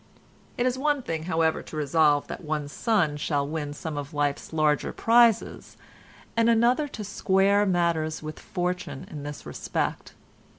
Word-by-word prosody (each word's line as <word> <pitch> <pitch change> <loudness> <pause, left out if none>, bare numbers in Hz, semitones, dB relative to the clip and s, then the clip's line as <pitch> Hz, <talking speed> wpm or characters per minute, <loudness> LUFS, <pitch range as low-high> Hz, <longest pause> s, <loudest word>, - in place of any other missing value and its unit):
It 245 - +1
is 255 0 0
one 290 -1 +1
thing 160 -4 -4
however 160 -2 +1
to - - -10
resolve 150 0 +3
that - - -7
one's 150 -2 -3
son 175 -10 +1
shall 145 -2 -1
win 150 -1 -3
some 155 0 -6
of 145 +1 -8
life's 145 -1 -1
larger 155 -2 +1
prizes, 235 -1 +2 0.6
and 230 0 +3
another 240 +6 +3
to 225 -6 -7
square 200 0 +2
matters 170 -4 0
with 155 0 -7
fortune 180 -4 -4
in 150 - -6
this 145 0 -7
respect. - - -3
165 Hz, 155 wpm, -26 LUFS, 150-210 Hz, 0.6 s, resolve